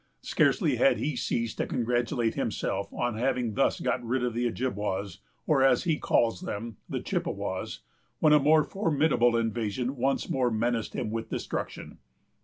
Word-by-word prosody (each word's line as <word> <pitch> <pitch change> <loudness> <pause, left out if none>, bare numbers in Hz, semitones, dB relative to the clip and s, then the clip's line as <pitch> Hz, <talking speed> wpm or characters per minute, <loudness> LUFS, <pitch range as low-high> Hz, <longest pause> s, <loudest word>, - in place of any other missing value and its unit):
Scarcely - - +2
had 270 0 +4
he 150 -1 -2
ceased 115 -1 -2
to - - 0
congratulate 120 -1 0
himself 100 +1 -2
on 120 -3 -2
having 125 -2 0
thus - - +1
got - - -1
rid 125 +2 -1
of 125 -2 -1
the 120 +1 0
Ojibwas, 105 -5 -3 0.3
or, 150 -4 +3
as 135 - +4
he 165 -4 0
calls 115 -6 +2
them, 110 0 -5
the - - -2
Chippewas, - - -3 0.4
when 155 -1 +4
a 150 - +7
more 155 +2 +5
formidable 150 - +2
invasion 115 +3 -1
once 135 +2 0
more 130 -2 +1
menaced 115 0 -1
him 115 -4 -2
with 115 0 -4
destruction. - - -5
120 Hz, 160 wpm, -28 LUFS, 115-135 Hz, 0.4 s, a